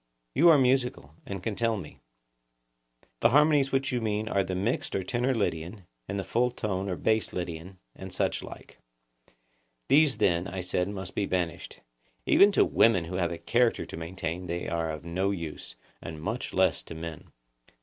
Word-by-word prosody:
You 170 +5 +6
are 160 - +8
musical, 125 - +1
and 100 -2 -5
can 110 -3 -2
tell 115 0 +1
me. 90 -6 -9 1.2
The - - +5
harmonies 145 0 +4
which 135 +1 +1
you 125 -2 -1
mean 110 -1 -1
are 100 -3 +1
the 95 0 -4
mixed 100 +7 -1
or 95 - 0
tenor 120 +7 0
Lydian, 90 -2 -2 0.2
and 100 - -3
the 100 - -2
full 120 +6 +1
toned 100 -5 -3
or 90 - -1
bass 110 +4 0
Lydian, 85 +1 -5 0.2
and - - -9
such - - 0
like. - - -11 1.1
These 145 -1 +5
then, 85 0 +2
I 95 0 -4
said, 90 +1 -1
must 95 -3 -6
be 100 - -1
banished; 85 -2 -3 0.4
even 200 +1 +6
to - - +5
women 95 -7 +3
who 90 +2 -4
have 85 -2 0
a 85 - -4
character 120 +6 +1
to - - -8
maintain 85 +1 -5
they 85 +1 -3
are 85 -1 -1
of 75 +1 -6
no 95 +3 0
use, 85 -6 -5 0.3
and 80 -2 -7
much 80 - -4
less - - +2
to 80 - -10
men. 80 -1 -7
95 Hz, 180 wpm, -28 LUFS, 85-120 Hz, 1.2 s, are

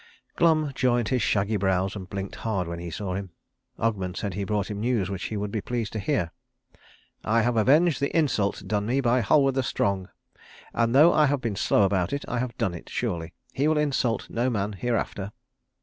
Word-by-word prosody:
Glum 155 -3 +3
joined 120 -2 +1
his 130 -2 +1
shaggy 105 +1 +1
brows 95 0 0
and 95 -2 -7
blinked 100 -1 -5
hard 100 -6 -2
when 85 0 -5
he 85 0 -6
saw 95 +3 -4
him. 95 0 -4 0.5
Ogmund 95 -5 -1
said 100 -2 -3
he 100 +2 -3
brought 105 0 -1
him 100 - -4
news 110 -4 0
which 95 -2 -4
he 110 - -3
would 105 0 -3
be 110 - -2
pleased 120 -2 -3
to 110 - -2
hear. 85 -3 0 0.9
"I 115 +1 +2
have 120 0 +1
avenged 145 +8 +4
the 140 - 0
insult 110 -11 +1
done 105 -1 -1
me 130 +4 +1
by 125 -1 +2
Halward 135 +5 +3
the 135 - +1
Strong, 100 -6 -1 0.6
and 115 +1 +1
though 155 +5 +7
I 150 -1 +4
have 145 0 +1
been 115 -5 -3
slow 100 - +3
about 95 0 +1
it 140 - -3
I 125 - -2
have 120 -1 -3
done 110 -7 0
it 85 - -9
surely. 85 -8 -3 0.2
He 140 +3 +1
will 155 0 +2
insult 135 -7 0
no 120 +3 0
man 105 -3 -1
hereafter." 105 -2 -2
110 Hz, 210 wpm, -26 LUFS, 100-125 Hz, 0.9 s, though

